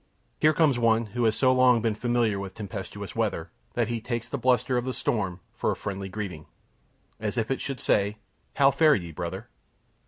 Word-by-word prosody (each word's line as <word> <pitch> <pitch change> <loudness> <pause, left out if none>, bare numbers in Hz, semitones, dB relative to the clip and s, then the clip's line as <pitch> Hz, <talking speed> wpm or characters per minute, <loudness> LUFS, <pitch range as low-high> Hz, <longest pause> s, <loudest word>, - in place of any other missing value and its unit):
Here 155 - +5
comes 150 -5 +3
one 115 0 +3
who 120 -1 +1
has 110 -1 +3
so 130 -1 +4
long 125 -2 +5
been 110 -1 0
familiar 115 -2 +1
with 95 -1 -6
tempestuous 105 -4 -6
weather - - -1 0.2
that 120 -2 +1
he 115 -1 -3
takes 120 0 -4
the 140 - -1
bluster 125 0 +2
of 125 - +1
the 130 0 -3
storm 95 -5 -1
for - - -1
a - - 0
friendly 95 -1 -5
greeting, 95 -7 -6 0.7
as 110 +2 -3
if 115 +2 0
it 135 - -1
should 135 -3 -4
say, 100 +1 +1 0.4
"How 140 0 +5
fare 150 +2 +5
ye, 85 -3 -4
brother?" 85 +2 -5
115 Hz, 195 wpm, -27 LUFS, 100-125 Hz, 0.7 s, Here